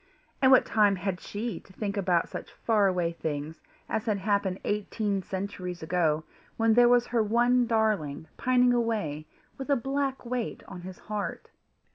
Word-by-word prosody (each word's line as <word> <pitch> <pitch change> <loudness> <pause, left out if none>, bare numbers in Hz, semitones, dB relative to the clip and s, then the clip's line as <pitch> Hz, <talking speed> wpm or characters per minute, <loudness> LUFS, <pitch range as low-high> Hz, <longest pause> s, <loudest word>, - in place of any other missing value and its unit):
And 260 - +6
what 260 - +7
time 210 -2 +3
had 185 -1 -3
she 210 -3 -4
to 190 - -19
think 200 0 -3
about 180 -4 +1
such - - -7
far 215 -3 +2
away 180 -3 0
things 155 -1 -5 0.3
as 220 +2 -2
had 210 -2 +2
happened 195 -1 0
eighteen 205 -1 -1
centuries 185 -2 -5
ago, 160 -2 +1 0.3
when 225 0 +4
there 240 +1 +6
was 245 0 +5
her 235 -1 +1
one 240 +3 +3
darling 210 - 0
pining 250 -1 +3
away 210 -11 -1 0.3
with 270 - -6
a 280 - +5
black 270 +1 -2
weight 240 -1 -3
on 180 -2 -8
his 185 0 -9
heart! 210 -1 -5
205 Hz, 165 wpm, -28 LUFS, 180-235 Hz, 0.3 s, what